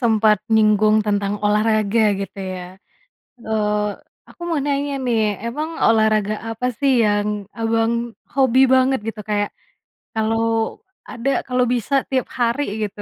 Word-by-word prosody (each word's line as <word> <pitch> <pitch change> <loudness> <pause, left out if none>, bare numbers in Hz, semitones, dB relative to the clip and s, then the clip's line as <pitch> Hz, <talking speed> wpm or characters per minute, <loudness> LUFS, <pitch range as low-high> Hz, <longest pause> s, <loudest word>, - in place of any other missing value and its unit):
sempat 220 -3 +3
nyinggung 215 -1 +4
tentang 205 0 0
olahraga, 210 +1 +2 0.2
gitu 195 0 -7 0.2
ya. 180 - -6 0.8
Eee, 210 -1 0 0.4
aku - - -19
mau 330 - 0
nanya 285 0 -1
nih, 235 -3 +1 0.2
emang 295 +7 -3 0.2
olahraga 215 -2 +3
apa 225 +2 -3
sih 275 -1 +2
yang 205 0 +1 0.3
Abang 225 0 +1 0.4
hobi 260 -2 +3
banget, 260 +1 +3
gitu, 220 -1 -5
kayak 205 0 0 0.6
kalau 225 0 0 0.3
ada 240 +2 -3 0.2
kalau 250 0 +2
bisa 245 +3 -3 0.2
tiap 260 -2 0
hari, 240 +4 +1 0.2
gitu, 205 0 -8
225 Hz, 130 wpm, -20 LUFS, 210-250 Hz, 0.8 s, nyinggung